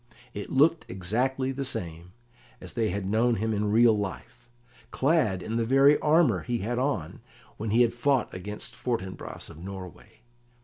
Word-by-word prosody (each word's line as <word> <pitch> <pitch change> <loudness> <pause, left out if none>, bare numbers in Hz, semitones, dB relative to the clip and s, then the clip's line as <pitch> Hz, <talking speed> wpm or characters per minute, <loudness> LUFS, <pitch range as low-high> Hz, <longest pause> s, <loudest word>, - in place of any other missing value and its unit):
It 100 - -6
looked 155 +4 +3
exactly 125 +9 -1
the 135 +1 -3
same 85 -8 -5 0.5
as - - -9
they 115 -3 0
had 100 +1 -3
known 115 +4 +2
him 110 +2 -1
in 105 0 0
real 115 0 +5
life, 105 +4 -6 0.4
clad 130 - +1
in 115 +1 -3
the 115 - +1
very 135 +5 +5
armour 150 - +3
he 120 +4 -2
had 120 +3 -2
on 125 - -2 0.4
when 110 +1 -4
he 115 +4 +5
had 120 -1 +1
fought 130 0 +1
against 105 +4 -7
Fortinbras 110 -6 -4
of 80 - -13
Norway. 95 +3 -10
115 Hz, 165 wpm, -27 LUFS, 100-130 Hz, 0.5 s, real